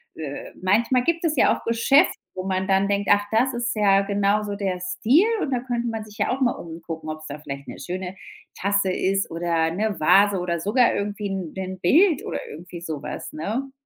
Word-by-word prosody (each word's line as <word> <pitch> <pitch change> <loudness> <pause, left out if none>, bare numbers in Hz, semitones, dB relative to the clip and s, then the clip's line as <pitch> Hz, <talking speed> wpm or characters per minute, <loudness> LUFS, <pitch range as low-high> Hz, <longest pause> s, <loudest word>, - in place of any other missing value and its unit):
äh. 145 -3 -6
Manchmal 230 +7 +2
gibt 335 +4 0
es 320 -2 +1
ja 260 - +4
auch - - -10
Geschäfte, 230 +5 +3 0.2
wo 185 - -4
man 190 0 -1
dann 195 0 +3
denkt: 200 0 0
„Ach, 205 0 +4
das 250 +4 +2
ist 240 0 -2
ja 200 -2 +4
genauso 200 +1 0
der 190 -3 -2
Stil“, 200 - +3 0.2
und 275 - -2
da 250 - +1
könnte 240 -1 -2
man 225 -1 -4
sich 210 0 -14
ja - - +1
auch 270 - -10
mal 245 -2 +4
umgucken, 165 -1 -8
ob 155 0 -5
's 155 - -9
da 145 - -6
vielleicht 140 -2 -7
'ne - - -8
schöne 180 +5 -5 0.4
Tasse 200 -1 +1
ist 195 +1 0
oder 165 -1 0
'ne 205 +2 -2
Vase 195 +5 +5
oder 170 -1 -2
sogar 230 +8 +3
irgendwie 205 0 -3
'n 190 -5 -4
'n 190 0 -5
Bild 315 - +4
oder - - -3
irgendwie 170 +2 -9
so 155 -4 -5
was, - - -6
ne, 225 - -3
200 Hz, 210 wpm, -23 LUFS, 180-230 Hz, 0.4 s, Vase